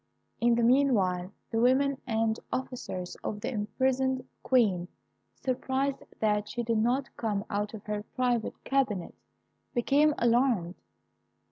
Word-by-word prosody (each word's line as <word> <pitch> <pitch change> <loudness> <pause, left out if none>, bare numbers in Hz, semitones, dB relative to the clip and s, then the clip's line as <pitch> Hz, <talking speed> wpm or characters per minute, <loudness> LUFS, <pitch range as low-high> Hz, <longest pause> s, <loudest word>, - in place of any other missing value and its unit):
In 235 0 +4
the 235 - +1
meanwhile, 210 -9 +3 0.2
the 225 - +1
women 265 +3 +3
and 225 -1 +1
officers 240 -8 -4
of 210 - -3
the - - -2
imprisoned 260 +4 0
Queen, 200 -9 +2 0.5
surprised 265 +1 -1 0.2
that 210 -1 +1
she 240 - -3
did 230 -1 +1
not 250 +5 0
come 210 -3 -1
out 205 +1 -2
of 210 - -10
her 210 -1 -2
private 245 -3 0
cabinet, 250 -10 0 0.6
became 285 +5 +3
alarmed. 235 -7 +2
235 Hz, 125 wpm, -29 LUFS, 210-260 Hz, 0.6 s, In